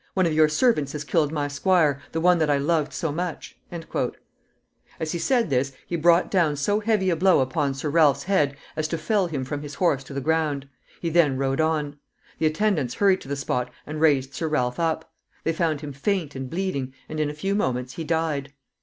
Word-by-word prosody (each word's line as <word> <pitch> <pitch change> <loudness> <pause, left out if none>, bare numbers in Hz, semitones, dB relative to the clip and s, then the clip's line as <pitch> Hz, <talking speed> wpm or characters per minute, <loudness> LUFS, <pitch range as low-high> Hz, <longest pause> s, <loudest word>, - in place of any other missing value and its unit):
"One 185 -2 +3
of 165 - +1
your 155 0 +5
servants 155 - +2
has 150 -1 -4
killed 150 -1 +1
my 145 -2 -1
squire 145 -1 +2
the 160 - -2
one 180 +1 +4
that 155 -2 +2
I 145 - +3
loved 150 +1 +1
so 165 - -2
much." 175 +2 -4 1.4
As 160 -1 -2
he 170 - -2
said 240 - +1
this, 135 +1 +1
he 175 - -3
brought 170 +1 +3
down 170 -6 +2
so 205 +9 +1
heavy 210 -4 +1
a - - +2
blow 185 +3 +4
upon 135 +1 0
Sir 135 +3 -4
Ralph's 145 -2 +4
head 150 -8 +1 0.2
as 155 0 -1
to 165 - -2
fell 190 +4 +1
him 140 -6 -3
from 145 +2 -4
his 145 -1 -7
horse 150 -7 +1
to 140 - -9
the - - 0
ground. 150 -1 0 0.3
He 170 - -2
then 155 -5 +3
rode 135 +2 0
on. 150 -2 -1 0.4
The 160 - +3
attendants 155 - 0
hurried 195 -2 +3
to - - -11
the 140 - -2
spot 125 -3 -2 0.2
and 155 +1 -5
raised 140 -4 +3
Sir 160 - -2
Ralph 125 -4 0
up. 160 -1 -1 0.3
They 165 - +1
found 160 -3 0
him 145 -2 -6
faint 160 +1 -1
and 130 -1 -6
bleeding, 140 -7 -3
and 155 - -5
in 150 -1 +1
a - - -5
few 195 +6 -2
moments 125 -10 -1
he 165 - -5
died. 155 -3 -1
155 Hz, 215 wpm, -24 LUFS, 140-170 Hz, 1.4 s, your